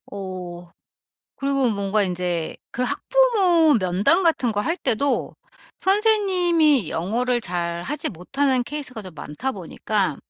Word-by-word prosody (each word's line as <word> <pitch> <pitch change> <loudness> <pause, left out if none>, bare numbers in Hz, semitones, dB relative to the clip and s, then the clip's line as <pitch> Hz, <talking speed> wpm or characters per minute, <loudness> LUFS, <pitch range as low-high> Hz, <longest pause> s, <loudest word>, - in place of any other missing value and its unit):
어 180 -3 -7 0.7
그리고 275 -3 +1
뭔가 200 0 0
인제 180 -2 -2 0.2
그 250 - -2
학부모 370 - +3
면담 195 - +2
같은 265 -8 +2
거 205 - -1
할 330 +9 -1
때도 270 +3 0 0.4
선생님이 365 - +3
영어를 240 +8 0
잘하지 175 - -3
못하는 260 - 0
케이스가 265 -5 -6
좀 185 -4 -10
많다 190 - -4
보니까 195 - -2
245 Hz, 250 characters per minute, -22 LUFS, 185-305 Hz, 0.7 s, 학부모